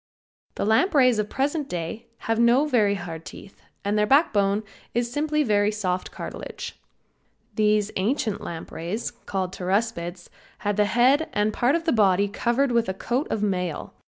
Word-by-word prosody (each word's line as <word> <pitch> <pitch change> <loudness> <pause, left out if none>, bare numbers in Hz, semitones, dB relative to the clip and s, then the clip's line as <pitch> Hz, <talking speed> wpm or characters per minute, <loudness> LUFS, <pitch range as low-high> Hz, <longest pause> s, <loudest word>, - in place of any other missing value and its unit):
The - - -1
lampreys 255 - +4
of 210 0 -1
the - - -15
present 285 +2 0
day 175 +7 -5 0.2
have 225 0 +1
no 240 +5 +5
very 215 -8 +2
hard 165 -3 -6
teeth 195 - -12 0.2
and 205 +1 +1
their 210 - +2
backbone 210 -8 +3 0.3
is 240 0 0
simply 300 +1 +1
very 205 -4 +2
soft 185 -4 -2
cartilage. - - -7 0.8
These 210 0 +2
ancient 215 +1 0
lampreys, 170 +5 -5 0.2
called 190 -2 -2
Pteraspids, 185 -2 -2 0.4
had 205 0 0
the 210 - +4
head 255 +9 +3
and 210 +1 +1
part 245 +7 +2
of 335 - -1
the 330 - +1
body 200 -3 +4
covered 240 +6 0
with 235 -3 +2
a 190 - -2
coat 245 +8 -1
of 210 - -1
mail. 180 -5 -2
215 Hz, 160 wpm, -25 LUFS, 195-245 Hz, 0.8 s, no